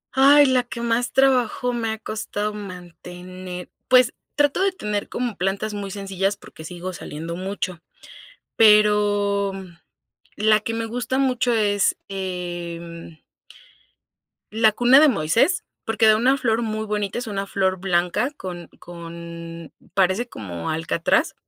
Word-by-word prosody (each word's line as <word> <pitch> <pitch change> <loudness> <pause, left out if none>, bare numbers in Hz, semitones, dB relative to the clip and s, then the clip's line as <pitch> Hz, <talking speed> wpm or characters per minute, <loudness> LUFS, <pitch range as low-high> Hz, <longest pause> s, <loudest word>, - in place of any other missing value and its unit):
Ay, 285 +2 +7
la 260 -2 +3
que 240 -1 -7
más 235 +1 0
trabajo 250 -2 +2
me 230 -2 -2
ha 220 - -4
costado 210 -1 -4
mantener. 180 -1 -9 0.2
Pues, 255 -1 +5 0.2
trato 290 +4 +2
de 390 - +3
tener 210 - -4
como 245 -3 -3
plantas 195 +3 -2
muy 200 -1 -5
sencillas, 195 0 -2
porque 160 - -13
sigo 180 +3 -6
saliendo 165 0 -6
mucho. 185 -1 -4 0.8
Pero 205 -2 +4 0.8
la 215 0 +3
que 230 - -3
me 225 0 -2
gusta 245 +3 -2
mucho 255 -2 +1
es, 205 -3 +2
em 175 -3 -6 1.3
la 220 0 +4
cuna 245 +5 +6
de 310 - +7
Moisés, 230 - +2 0.2
porque 225 0 +2
da 215 - +7
una 260 +5 +3
flor 235 -3 +1
muy 220 -1 -3
bonita, 210 -1 -2
es 240 0 -4
una 200 -2 -3
flor 190 -1 0
blanca 180 +7 0
con 175 -3 -7
con 170 -1 -9 0.2
parece 195 +5 +2
como 90 - -6
alcatraz. 165 - +1
205 Hz, 135 wpm, -22 LUFS, 180-235 Hz, 1.3 s, Ay